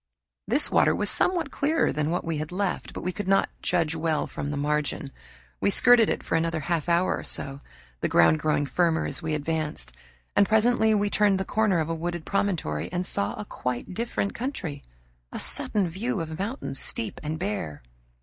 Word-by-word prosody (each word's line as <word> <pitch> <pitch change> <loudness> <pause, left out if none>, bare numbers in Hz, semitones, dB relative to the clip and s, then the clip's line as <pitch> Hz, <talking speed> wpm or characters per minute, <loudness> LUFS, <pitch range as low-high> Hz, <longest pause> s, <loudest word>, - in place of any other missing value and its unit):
This - - +3
water - - +4
was 210 0 +1
somewhat 340 -6 +1
clearer 305 +3 +1
than 150 0 -1
that 175 - -1
we 165 -2 -2
had 155 +2 -5
left, 195 +1 -2
but - - -7
we 180 - -1
could 205 +1 -6
not 195 0 +3
judge 165 -3 +1
well 160 -1 0
from 145 - -5
the 145 - -3
margin. 145 -1 -1 0.5
We - - +2
skirted 240 +2 +6
it - - -2
for - - -5
another 165 0 0
half 170 +1 -1
hour 170 +2 +2
or - - -6
so, 135 0 -4 0.4
the - - -1
ground 85 - +5
growing 150 -1 +1
firmer 165 +2 +1
as - - -3
we 160 -2 -1
advanced, 155 0 -3 0.4
and 200 - +4
presently 220 0 +3
we 205 0 0
turned 205 -2 +3
the 190 - -2
corner 215 -4 +1
of 155 - -1
a - - 0
wooded 170 0 -4
promontory 175 - -1
and 180 +1 -2
saw 100 - -1
a 105 - -5
quite 125 +7 -4
different 225 -1 -2
country 195 - -5 0.5
a - - -6
sudden 200 -4 +4
view 205 +6 -3
of 160 0 -5
mountains, 200 - -3
steep 110 - -2
and 155 +1 -3
bare. 180 - -4
170 Hz, 195 wpm, -26 LUFS, 150-205 Hz, 0.5 s, skirted